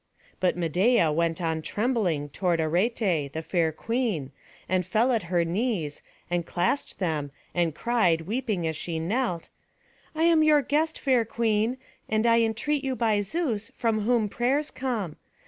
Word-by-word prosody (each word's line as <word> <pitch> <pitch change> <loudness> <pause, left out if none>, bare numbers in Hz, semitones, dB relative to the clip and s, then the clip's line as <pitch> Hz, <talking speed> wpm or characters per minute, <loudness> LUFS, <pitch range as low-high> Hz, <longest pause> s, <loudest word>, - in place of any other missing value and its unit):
But 180 -1 +1
Medeia 175 +2 +3
went 165 +1 0
on 160 -1 -1
trembling 195 - -1
toward 175 +2 0
Arete, 175 - +1
the 160 - -4
fair 170 -3 +1
queen, 210 - -2 0.4
and 185 0 +1
fell 230 +7 +2
at 230 -3 +2
her 175 -2 +2
knees, 175 - -2 0.3
and 175 0 -1
clasped 180 - -1
them, 155 -6 -1 0.2
and 170 -3 0
cried 200 -9 +2
weeping 210 -1 -2
as 160 -1 -1
she 165 +2 -3
knelt: 180 +1 -1 0.7
"I 320 - +1
am 335 -1 +5
your 305 -2 +5
guest, 315 +4 0
fair 255 -4 +3
queen, 225 +1 0 0.3
and 220 +1 +1
I 230 0 +5
entreat 240 +6 0
you 265 -1 -1
be 215 -3 +2
Zeus 225 - -2
from 225 -3 0
whom 225 0 +2
prayers 265 +8 0
come. 225 - -3
210 Hz, 155 wpm, -26 LUFS, 170-245 Hz, 0.7 s, am